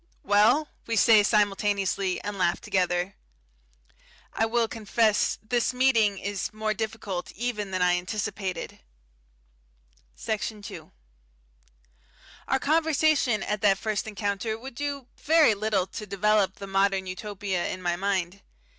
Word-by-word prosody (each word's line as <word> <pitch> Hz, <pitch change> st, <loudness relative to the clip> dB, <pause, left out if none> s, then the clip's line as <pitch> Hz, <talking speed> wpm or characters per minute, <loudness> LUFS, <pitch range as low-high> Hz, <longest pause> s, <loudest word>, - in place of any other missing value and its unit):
"Well?" 220 Hz, +10 st, +4 dB, 0.2 s
we 230 Hz, -, -1 dB
say, 220 Hz, 0 st, +6 dB
simultaneously, 200 Hz, -2 st, +1 dB
and 205 Hz, 0 st, -4 dB
laugh 180 Hz, -3 st, +1 dB
together. 180 Hz, 0 st, 0 dB, 1.2 s
I 225 Hz, -, +1 dB
will 230 Hz, 0 st, +1 dB
confess 220 Hz, -1 st, +1 dB
this 240 Hz, +2 st, 0 dB
meeting 230 Hz, -6 st, +3 dB
is 200 Hz, 0 st, -3 dB
more 215 Hz, 0 st, -2 dB
difficult 215 Hz, -4 st, -4 dB
even 215 Hz, -3 st, -3 dB
than 185 Hz, -1 st, 0 dB
I 180 Hz, 0 st, +4 dB
anticipated. 190 Hz, -1 st, -4 dB, 1.4 s
Section 215 Hz, -, -4 dB
2 -, -, -9 dB, 1.6 s
Our 265 Hz, -, +2 dB
conversation 310 Hz, -6 st, +2 dB
at 210 Hz, -1 st, -2 dB
that 195 Hz, -2 st, +4 dB
first 215 Hz, 0 st, -2 dB
encounter 205 Hz, +1 st, -2 dB
would 265 Hz, +4 st, -9 dB
do 280 Hz, 0 st, -4 dB
very 310 Hz, -6 st, +4 dB
little 205 Hz, -2 st, 0 dB
to 210 Hz, +2 st, -8 dB
develop 200 Hz, -1 st, +2 dB
the 200 Hz, -, -8 dB
Modern 195 Hz, 0 st, +1 dB
Utopia 190 Hz, -1 st, -3 dB
in 185 Hz, -, -4 dB
my 175 Hz, -1 st, -1 dB
mind. 195 Hz, 0 st, -2 dB
210 Hz, 125 wpm, -26 LUFS, 195-225 Hz, 1.6 s, say